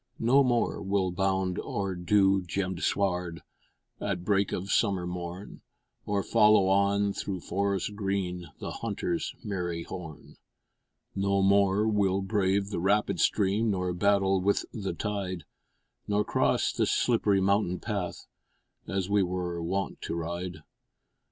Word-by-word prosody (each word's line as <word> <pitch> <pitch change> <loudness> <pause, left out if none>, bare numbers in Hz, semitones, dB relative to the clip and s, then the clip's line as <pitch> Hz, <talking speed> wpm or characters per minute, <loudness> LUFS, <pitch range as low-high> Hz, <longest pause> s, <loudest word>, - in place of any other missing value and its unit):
No 130 +5 +4
more 120 -2 +1
we'll 95 -2 0
bound 95 -1 0
o'er 100 -2 -3
dew 95 +2 +3
gemmed 90 0 -3
sward 90 -4 -1 0.6
At 90 0 -3
break 100 -1 +2
of 95 +2 -3
summer 95 -5 +2
morn, 90 +2 -6 0.5
Or 100 -1 0
follow 105 -3 +4
on, 100 +1 +2
through 95 -3 -4
forests 100 0 -1
green, 95 -4 -3
The - - -5
hunter's 115 - -3
merry 90 -5 -3
horn; 85 -6 -9 0.8
No 100 0 +1
more 100 +1 +3
we'll 100 -3 +2
brave 100 0 0
the 90 - -2
rapid 100 0 +1
stream, 105 +2 +2
Nor 90 -3 -1
battle 95 0 +2
with 100 +2 +1
the 100 -4 -3
tide, 95 -5 -3 0.6
Nor 105 0 +2
cross - - +1
the - - +1
slipp'ry 105 -5 +2
mountain 95 -1 +1
path, 100 -6 -4 0.6
As 95 -1 -1
we 100 0 +3
were 90 -2 -2
wont 95 +4 -3
to - - -4
ride. 85 +2 -5
95 Hz, 130 wpm, -28 LUFS, 90-100 Hz, 0.8 s, No